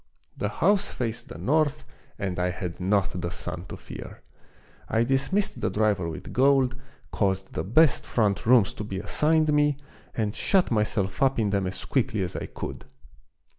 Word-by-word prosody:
The 105 Hz, -, -2 dB
house 200 Hz, -, +2 dB
faced 115 Hz, -1 st, -3 dB
the -, -, -8 dB
north 150 Hz, +1 st, +1 dB, 0.3 s
and 95 Hz, -3 st, -3 dB
I 90 Hz, 0 st, +1 dB
had 90 Hz, -1 st, -5 dB
not 95 Hz, -1 st, 0 dB
the 85 Hz, -, -2 dB
sun 85 Hz, +1 st, -5 dB
to -, -, -7 dB
fear. -, -, -10 dB, 0.7 s
I 110 Hz, +1 st, +2 dB
dismissed 135 Hz, -, 0 dB
the 110 Hz, -, +1 dB
driver 105 Hz, -5 st, +1 dB
with 80 Hz, -, -8 dB
gold, 130 Hz, -1 st, +4 dB, 0.4 s
caused 95 Hz, -2 st, -1 dB
the -, -, -2 dB
best 135 Hz, -, +4 dB
front 105 Hz, -3 st, 0 dB
rooms 120 Hz, -5 st, +5 dB
to -, -, -6 dB
be 100 Hz, -2 st, -5 dB
assigned 155 Hz, +8 st, +2 dB
me, 145 Hz, -1 st, +3 dB, 0.4 s
and 105 Hz, -2 st, -1 dB
shut 190 Hz, +3 st, +2 dB
myself 105 Hz, -3 st, 0 dB
up 135 Hz, -1 st, +3 dB
in 105 Hz, -3 st, +1 dB
them 100 Hz, -2 st, +1 dB
as 95 Hz, -, -6 dB
quickly 120 Hz, -6 st, 0 dB
as 90 Hz, -, -4 dB
I -, -, -4 dB
could -, -, -7 dB
110 Hz, 170 wpm, -26 LUFS, 95-135 Hz, 0.7 s, rooms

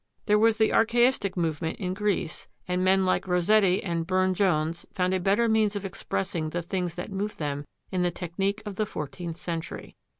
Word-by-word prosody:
There 210 Hz, 0 st, +4 dB
was 225 Hz, 0 st, +4 dB
the 220 Hz, -1 st, +3 dB
Archaistic 235 Hz, -4 st, +3 dB
movement 160 Hz, -1 st, -1 dB
in 185 Hz, -1 st, -2 dB
Greece, 200 Hz, -4 st, -2 dB, 0.2 s
and 180 Hz, 0 st, 0 dB
men 190 Hz, 0 st, +4 dB
like 185 Hz, -, +1 dB
Rossetti 185 Hz, +2 st, +3 dB
and 170 Hz, -3 st, -2 dB
Burne 185 Hz, 0 st, +2 dB
Jones 170 Hz, -3 st, +1 dB
found 180 Hz, 0 st, 0 dB
a 190 Hz, -, +1 dB
better 200 Hz, +6 st, +2 dB
means 220 Hz, -2 st, +2 dB
of 200 Hz, -1 st, -3 dB
expressing 185 Hz, -3 st, -2 dB
the 175 Hz, +2 st, -3 dB
things 180 Hz, -1 st, -2 dB
that 180 Hz, +3 st, -6 dB
moved 205 Hz, +2 st, -3 dB
them 145 Hz, -1 st, -3 dB, 0.3 s
in 185 Hz, -, 0 dB
the 180 Hz, -, +2 dB
technique 195 Hz, +5 st, -2 dB
of 205 Hz, -2 st, -6 dB
the 215 Hz, -, 0 dB
fourteenth 165 Hz, 0 st, -5 dB
century. 165 Hz, -2 st, -5 dB
185 Hz, 190 wpm, -27 LUFS, 170-205 Hz, 0.3 s, There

